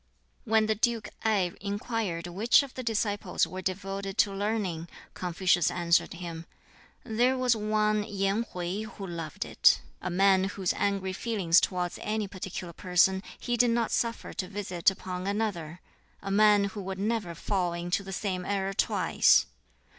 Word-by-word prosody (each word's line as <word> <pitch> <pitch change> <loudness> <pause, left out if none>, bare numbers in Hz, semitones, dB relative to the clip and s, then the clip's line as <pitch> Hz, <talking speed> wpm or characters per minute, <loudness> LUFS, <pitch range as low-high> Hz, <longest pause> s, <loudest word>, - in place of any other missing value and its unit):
When 220 -1 +3
the 220 - +2
Duke 230 +1 0
Ngai 200 -6 +1
inquired 205 -4 -3
which 205 +10 +3
of 275 - -9
the 255 - -5
disciples 205 -5 0
were 185 +1 -7
devoted 195 +1 -4
to 200 - +3
learning, 195 -5 -2 0.3
Confucius 180 -1 +1
answered 170 -1 +1
him, 170 -2 -7 0.6
"There 245 +3 +1
was 250 -2 +3
one 215 0 +1
Yen 200 +1 0
Hwķi 180 +3 -4
who 205 -3 -8
loved 165 -4 -5
it - - +4 0.2
a 185 - -3
man 190 +1 +4
whose 195 -2 -1
angry 195 -2 -1
feelings 190 -5 +2
towards 180 -2 -2
any 215 -1 -2
particular 185 -2 -6
person 190 +1 +2 0.2
he 240 - -1
did 240 0 +4
not 230 -1 +1
suffer 230 -1 -1
to 185 - -3
visit 190 -3 +1
upon 185 -1 -5
another; 195 -6 -2 0.4
a 195 - -5
man 210 0 +5
who 205 - -5
would 190 0 -5
never 205 -4 -2
fall 180 -3 -1
into 175 +2 -1
the 195 - -8
same 190 -2 -2
error 195 0 -1
twice. - - +3
195 Hz, 155 wpm, -28 LUFS, 180-215 Hz, 0.6 s, man